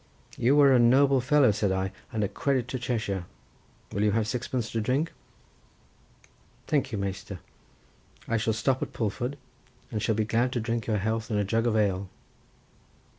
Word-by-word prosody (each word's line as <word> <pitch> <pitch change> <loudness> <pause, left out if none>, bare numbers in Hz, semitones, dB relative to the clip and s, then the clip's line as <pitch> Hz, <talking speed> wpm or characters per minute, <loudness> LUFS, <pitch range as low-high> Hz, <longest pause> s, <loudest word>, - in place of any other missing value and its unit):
"You 135 +5 +3
are 140 -2 +7
a 125 - +5
noble 135 +3 +5
fellow," 130 -1 +4
said 100 -1 0
I, 95 0 -1 0.2
"and 110 -1 -1
a - - +1
credit 130 +2 -1
to 130 - -3
Cheshire. 110 -7 -2 0.7
Will 100 - -2
you 105 -1 +2
have 110 -1 +1
sixpence 120 -1 -3
to 115 - -1
drink?" 135 +9 0 1.5
"Thank 145 -5 0
you, 110 - -2
Measter, 100 0 -4 0.9
I 115 - +1
shall 110 0 0
stop 130 +4 0
at - - -4
Pulford, 125 +5 -2 0.5
and 110 -3 -2
shall 110 +1 +1
be 110 0 0
glad 120 +4 +1
to 120 - 0
drink 115 0 -2
your 110 -2 +1
health 110 +2 -2
in 105 - 0
a 105 - +2
jug 115 +4 +1
of 115 - +1
ale." 100 -2 0
115 Hz, 175 wpm, -27 LUFS, 105-125 Hz, 1.5 s, are